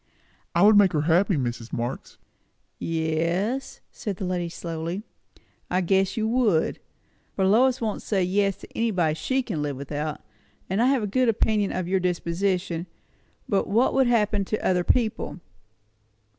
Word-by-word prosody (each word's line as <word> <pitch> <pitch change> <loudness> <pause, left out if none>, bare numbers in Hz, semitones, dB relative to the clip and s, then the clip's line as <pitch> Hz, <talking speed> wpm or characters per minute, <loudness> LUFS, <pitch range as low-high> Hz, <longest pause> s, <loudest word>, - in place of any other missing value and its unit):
"I 170 - +4
would 215 +1 +7
make 195 -3 +5
her 150 - +2
happy, 175 +5 +3
Mrs. 120 -4 -3
Marx!" 120 +3 -4 0.6
"Yes," 165 +10 -1
said 205 -3 -5
the 190 - -4
lady 180 -2 -2
slowly 170 +3 -5 0.7
"I 180 +1 +1
guess 190 +4 +1
you 220 0 +1
would; 225 -8 +1 0.6
for 190 - +1
Lois 245 +6 +4
won't 215 -3 -2
say 195 -3 0
yes 195 +1 +1
to - - -12
anybody 185 -9 +1
she 260 +12 -1
can 180 -11 -3
live 145 -2 -3
without; 145 +2 -4 0.5
and 195 +4 0
I've 260 -1 +3
a - - 0
good 245 +4 +2
opinion 210 -2 +1
of 185 -1 -3
your 190 +1 +1
disposition; 180 0 -1 0.6
but 200 -2 +1
what 230 +5 +2
would 265 -2 +3
happen 210 -4 +2
to 215 - -3
other 180 -1 +2
people?" 220 -2 0
190 Hz, 155 wpm, -25 LUFS, 165-215 Hz, 0.7 s, would